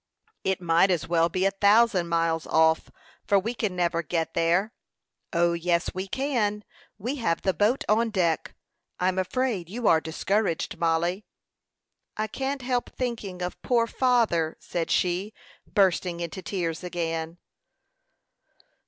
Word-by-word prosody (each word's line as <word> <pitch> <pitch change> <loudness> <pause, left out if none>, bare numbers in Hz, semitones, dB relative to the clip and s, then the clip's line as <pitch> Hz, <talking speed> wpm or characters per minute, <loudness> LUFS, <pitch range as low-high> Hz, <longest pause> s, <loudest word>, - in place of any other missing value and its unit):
"It 190 -1 0
might 170 +2 +3
as 165 -3 0
well 165 0 +3
be 185 +3 0
a 195 - +3
thousand 200 -2 +3
miles 165 -1 0
off; 160 0 +3 0.4
for 200 - +4
we 220 +5 -1
can 215 -6 -2
never 170 -1 +1
get 165 0 -2
there." 175 +7 +1 0.6
"O, 170 -1 +2
yes, 170 0 0
we 185 +1 -4
can. 215 -5 -1 0.3
We 245 +8 -3
have 170 -10 -1
the 190 - +2
boat 210 - +2
on 225 +2 +3
deck. 170 - 0 0.4
I'm 185 +1 +1
afraid 200 -3 -1
you 230 +3 -2
are 160 -1 +5
discouraged, 180 +3 -1
Mollie." 170 +4 +1 0.9
"I 215 - 0
can't 270 +4 -3
help 245 -1 -1
thinking 215 -8 -4
of 180 - -5
poor 235 -2 +2
father," 230 -11 +1
said 170 -2 -3
she, 185 +4 0 0.4
bursting 185 -3 +2
into 170 +1 -5
tears 175 -4 -3
again. 165 -2 -3
185 Hz, 140 wpm, -26 LUFS, 170-215 Hz, 0.9 s, are